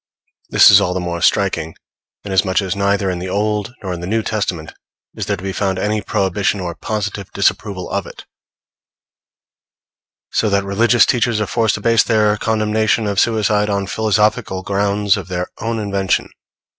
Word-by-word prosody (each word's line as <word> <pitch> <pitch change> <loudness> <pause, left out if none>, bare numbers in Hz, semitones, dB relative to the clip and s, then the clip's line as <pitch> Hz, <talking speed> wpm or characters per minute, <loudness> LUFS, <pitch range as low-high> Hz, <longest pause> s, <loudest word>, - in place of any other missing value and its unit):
This - - +7
is - - +7
all 90 - -1
the - - 0
more 85 -1 -4
striking, 80 0 +1 0.5
inasmuch 95 -1 +1
as 95 -2 -2
neither 100 -1 0
in 90 - -4
the 90 +1 -5
Old 105 +2 -1
nor 95 -2 -3
in 85 - -6
the 90 - -6
New 110 +2 0
Testament 90 -8 -3 0.4
is - - -5
there 100 - -1
to 90 - -11
be 95 0 -3
found 95 -1 -1
any 105 +2 -1
prohibition 100 -1 -1
or 90 -2 -4
positive 105 0 -4
disapproval 100 -1 -1
of - - -3
it; - - -12 2.1
so 110 - +1
that 100 0 +1
religious 115 +5 +3
teachers 120 -2 +1
are 105 - 0
forced 110 0 +1
to 100 - -7
base 115 0 +4
their 105 -2 +2
condemnation 110 0 0
of 100 -1 0
suicide 105 -2 +1
on 100 -1 -1
philosophical 105 -1 0
grounds 100 +1 +1
of 95 -4 -7
their 90 -1 -3
own 115 +1 -2
invention. 100 -3 -1
100 Hz, 170 wpm, -18 LUFS, 95-110 Hz, 2.1 s, This